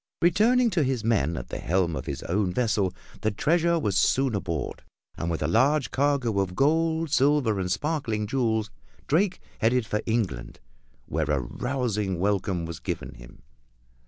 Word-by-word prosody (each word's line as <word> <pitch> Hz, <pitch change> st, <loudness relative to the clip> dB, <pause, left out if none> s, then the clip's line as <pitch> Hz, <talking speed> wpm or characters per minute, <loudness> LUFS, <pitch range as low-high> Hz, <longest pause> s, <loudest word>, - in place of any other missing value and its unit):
Returning 230 Hz, +8 st, +4 dB
to 175 Hz, -, +1 dB
his 130 Hz, -5 st, 0 dB
men 85 Hz, -9 st, +1 dB
at 60 Hz, -, -7 dB
the -, -, -5 dB
helm 85 Hz, -2 st, 0 dB
of -, -, -6 dB
his -, -, -4 dB
own 95 Hz, +1 st, 0 dB
vessel, 105 Hz, -4 st, +1 dB, 0.3 s
the 110 Hz, -, +2 dB
treasure 170 Hz, -, +2 dB
was 105 Hz, -, -1 dB
soon 130 Hz, +7 st, +2 dB
aboard, 85 Hz, -8 st, -3 dB, 0.3 s
and 85 Hz, -, -3 dB
with 80 Hz, -2 st, -2 dB
a -, -, +1 dB
large 135 Hz, -, +2 dB
cargo 135 Hz, -7 st, +1 dB
of 95 Hz, -2 st, -1 dB
gold, 160 Hz, -, +1 dB
silver 135 Hz, -7 st, +3 dB
and 90 Hz, -1 st, -2 dB
sparkling 135 Hz, -9 st, -1 dB
jewels 110 Hz, -3 st, 0 dB, 0.3 s
Drake 180 Hz, +5 st, +1 dB, 0.2 s
headed 120 Hz, +1 st, +2 dB
for 105 Hz, 0 st, -1 dB
England, 110 Hz, -, -2 dB, 0.5 s
where 80 Hz, 0 st, -2 dB
a 75 Hz, -2 st, +2 dB
rousing 105 Hz, -, -2 dB
welcome 95 Hz, -2 st, 0 dB
was 85 Hz, -1 st, -6 dB
given -, -, -5 dB
him. -, -, -15 dB
110 Hz, 160 wpm, -26 LUFS, 90-140 Hz, 0.5 s, Returning